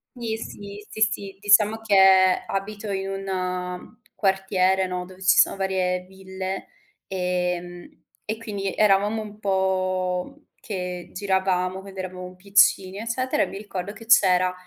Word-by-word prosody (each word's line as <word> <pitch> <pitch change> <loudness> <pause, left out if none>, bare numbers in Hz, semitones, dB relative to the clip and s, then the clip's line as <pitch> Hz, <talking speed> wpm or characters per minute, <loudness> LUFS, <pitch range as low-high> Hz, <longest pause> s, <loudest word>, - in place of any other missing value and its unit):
Sì, 230 -3 -3
sì. 205 -2 -9
Sì, 220 - -8
sì, 200 -2 0
diciamo 210 +1 +4
che 190 -3 +5
abito 205 +2 -4
in 195 0 -2
un 185 -2 -4 0.2
quartiere, 190 -1 +1
no, 180 0 -4
dove 185 +1 -15
ci 190 0 +4
sono - - +5
varie 185 -2 0
ville, 190 0 -6 0.4
ehm, 180 -2 -2 0.4
e 215 +1 -3
quindi 200 -4 -4
eravamo 210 +1 +3
un 210 -1 -10
po' 190 +5 -1
che 180 -3 -5
giravamo, 190 -1 0
quando 195 -1 -10
eravamo 185 0 -6
piccini, 195 0 +3
eccetera. 230 +4 0
E - - +1
mi 195 - -8
ricordo 200 -1 -6
che 225 +2 -13
c'era 185 -5 +5
190 Hz, 135 wpm, -24 LUFS, 185-205 Hz, 0.4 s, che